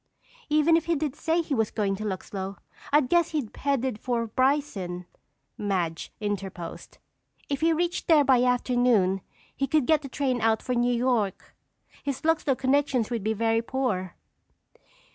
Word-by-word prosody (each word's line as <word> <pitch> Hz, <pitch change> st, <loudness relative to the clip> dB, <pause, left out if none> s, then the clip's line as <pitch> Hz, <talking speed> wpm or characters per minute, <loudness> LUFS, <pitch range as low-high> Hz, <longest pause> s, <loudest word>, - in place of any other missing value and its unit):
"Even 305 Hz, +2 st, +4 dB
if 330 Hz, -, +1 dB
he 335 Hz, -, +1 dB
did 295 Hz, -2 st, -2 dB
say 330 Hz, +2 st, 0 dB
he 310 Hz, -, -3 dB
was 225 Hz, -4 st, +1 dB
going 200 Hz, -3 st, -1 dB
to 210 Hz, -, -6 dB
Luxlow, 195 Hz, -1 st, -4 dB, 0.3 s
I'd 290 Hz, -2 st, +4 dB
guess 340 Hz, +4 st, +3 dB
he 295 Hz, -7 st, -2 dB
headed 265 Hz, -5 st, -1 dB
for 235 Hz, -1 st, -1 dB
Bryson," 225 Hz, -8 st, -1 dB, 0.5 s
Madge 180 Hz, -5 st, -2 dB
interposed. 195 Hz, -5 st, -5 dB, 0.5 s
"If 280 Hz, 0 st, -2 dB
he 330 Hz, +1 st, +4 dB
reached 345 Hz, +2 st, -1 dB
there 310 Hz, -3 st, +6 dB
by 260 Hz, -3 st, +4 dB
afternoon 245 Hz, -6 st, +2 dB, 0.3 s
he 275 Hz, -, -1 dB
could 300 Hz, -1 st, +2 dB
get 310 Hz, 0 st, +3 dB
a 275 Hz, -, -6 dB
train 255 Hz, -3 st, -1 dB
out 220 Hz, -1 st, +2 dB
for 250 Hz, -, -1 dB
New 240 Hz, 0 st, +2 dB
York. 235 Hz, -5 st, 0 dB, 0.5 s
His 280 Hz, -2 st, -3 dB
Luxlow 315 Hz, -5 st, +2 dB
connections 260 Hz, -3 st, +1 dB
would 230 Hz, -4 st, -2 dB
be 220 Hz, +1 st, +1 dB
very 225 Hz, +1 st, +1 dB
poor." 230 Hz, -8 st, -2 dB
250 Hz, 160 wpm, -26 LUFS, 210-285 Hz, 0.5 s, there